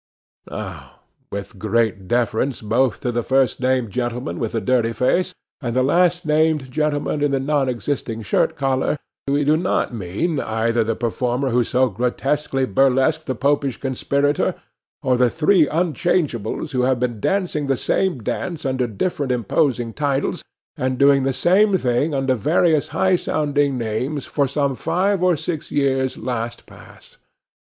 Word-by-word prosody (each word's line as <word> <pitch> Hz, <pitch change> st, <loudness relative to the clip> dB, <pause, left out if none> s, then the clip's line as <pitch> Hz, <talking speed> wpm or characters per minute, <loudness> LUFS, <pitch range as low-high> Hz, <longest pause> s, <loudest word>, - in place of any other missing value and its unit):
Now, -, -, -8 dB, 0.3 s
with 100 Hz, 0 st, -6 dB
great 110 Hz, -2 st, 0 dB
deference 120 Hz, +3 st, 0 dB
both 120 Hz, +3 st, +1 dB
to 125 Hz, -, -1 dB
the 120 Hz, 0 st, -1 dB
first 135 Hz, +2 st, +1 dB
named 130 Hz, -3 st, 0 dB
gentleman 120 Hz, +2 st, -3 dB
with 115 Hz, -3 st, -3 dB
the 115 Hz, -, 0 dB
dirty 120 Hz, -2 st, +1 dB
face, 180 Hz, -, +1 dB, 0.3 s
and 120 Hz, -3 st, -3 dB
the 130 Hz, -, +3 dB
last 175 Hz, +5 st, +2 dB
named 155 Hz, -3 st, +1 dB
gentleman 150 Hz, 0 st, -1 dB
in 145 Hz, -, +3 dB
the 135 Hz, -1 st, 0 dB
non 140 Hz, -1 st, +1 dB
existing 120 Hz, -2 st, -3 dB
shirt 95 Hz, -, +1 dB
collar, 135 Hz, +1 st, 0 dB, 0.3 s
we 140 Hz, +1 st, +2 dB
do 150 Hz, +2 st, +3 dB
not 170 Hz, -6 st, 0 dB
mean 115 Hz, -, -2 dB
either 115 Hz, 0 st, 0 dB
the 115 Hz, 0 st, -1 dB
performer 125 Hz, +3 st, -1 dB
who 120 Hz, +1 st, +3 dB
so 130 Hz, +3 st, +2 dB
grotesquely 135 Hz, +5 st, -1 dB
burlesqued 135 Hz, +7 st, +2 dB
the 130 Hz, -, -1 dB
Popish 140 Hz, 0 st, 0 dB
conspirator, 140 Hz, +2 st, 0 dB, 0.5 s
or 125 Hz, -1 st, +2 dB
the 125 Hz, -1 st, +4 dB
three 160 Hz, -, +3 dB
unchangeables 155 Hz, -, -1 dB
who 130 Hz, -2 st, 0 dB
have 130 Hz, 0 st, +2 dB
been 120 Hz, -3 st, -2 dB
dancing 175 Hz, -, -1 dB
the 135 Hz, -1 st, +1 dB
same 175 Hz, -, 0 dB
dance 165 Hz, -, -3 dB
under 130 Hz, -2 st, 0 dB
different 135 Hz, -, -2 dB
imposing 120 Hz, 0 st, 0 dB
titles, 140 Hz, 0 st, -1 dB, 0.3 s
and 130 Hz, 0 st, -1 dB
doing 140 Hz, 0 st, +5 dB
the 135 Hz, +1 st, +1 dB
same 190 Hz, +8 st, +3 dB
thing 130 Hz, +1 st, 0 dB
under 135 Hz, -1 st, +1 dB
various 155 Hz, -, +2 dB
high 190 Hz, -1 st, +2 dB
sounding 145 Hz, -5 st, 0 dB
names 125 Hz, +6 st, -2 dB
for 140 Hz, -2 st, 0 dB
some 140 Hz, 0 st, 0 dB
five 190 Hz, +8 st, 0 dB
or 180 Hz, -1 st, +3 dB
six 155 Hz, 0 st, -4 dB
years 135 Hz, -2 st, 0 dB
last 120 Hz, -1 st, -4 dB
past. -, -, -16 dB
135 Hz, 155 wpm, -21 LUFS, 120-150 Hz, 0.5 s, doing